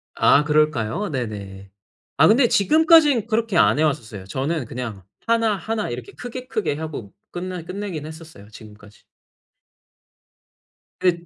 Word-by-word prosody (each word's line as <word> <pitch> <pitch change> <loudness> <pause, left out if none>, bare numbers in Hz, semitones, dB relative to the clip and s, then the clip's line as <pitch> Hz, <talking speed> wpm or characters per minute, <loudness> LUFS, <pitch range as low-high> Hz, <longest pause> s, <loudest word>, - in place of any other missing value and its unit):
아 145 - +4
그럴까요? 150 - 0
네네. 100 -7 -6 0.5
아 155 - +6
근데 240 +3 +5
지금까진 300 - +4
그렇게 225 -4 0
안 150 - +4
해 - - +3
왔었어요. 110 -10 -2
저는 135 - -2
그냥 115 -5 -6 0.2
1 230 -2 +2
1 220 - -3
이렇게 120 -1 -7
크게 250 +1 -8
크게 210 - -2
하고 150 -10 -7 0.2
끝나 180 0 -5
끝내긴 185 -5 -6
했었어요 160 -10 -12
지금까지. 105 -1 -15 2.0
끝 175 -2 +1
160 Hz, 265 characters per minute, -22 LUFS, -, 2.0 s, 아